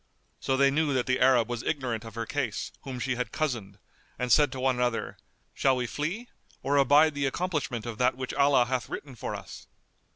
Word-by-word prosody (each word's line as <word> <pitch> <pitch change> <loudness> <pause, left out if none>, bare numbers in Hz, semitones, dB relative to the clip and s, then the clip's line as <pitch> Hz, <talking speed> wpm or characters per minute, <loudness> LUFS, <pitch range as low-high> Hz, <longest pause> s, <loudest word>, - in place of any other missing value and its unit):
So 135 - 0
they 140 0 +4
knew 150 -1 +1
that 125 - +1
the 130 0 +1
Arab 125 -3 +4
was 120 -1 -3
ignorant 120 -7 -2
of 115 - -10
her 115 0 -3
case, - - -3
whom 130 -2 -6
she 125 0 -1
had 125 - -3
cozened, 120 -10 -3 0.4
and 125 0 -2
said 150 -1 +5
to 130 - -6
one 130 -1 +1
another, 120 -2 -1 0.4
"Shall 135 -1 +2
we 125 -1 -1
flee 170 - -3 0.4
or 140 +1 +1
abide 145 +3 +5
the 140 -1 0
accomplishment 145 -7 -2
of 115 -1 -6
that 125 0 +2
which 130 -1 -4
Allah 140 -3 +4
hath 125 -2 -2
written 140 -3 -6
for 120 - -5
us?" - - -10
130 Hz, 205 wpm, -28 LUFS, 120-140 Hz, 0.4 s, said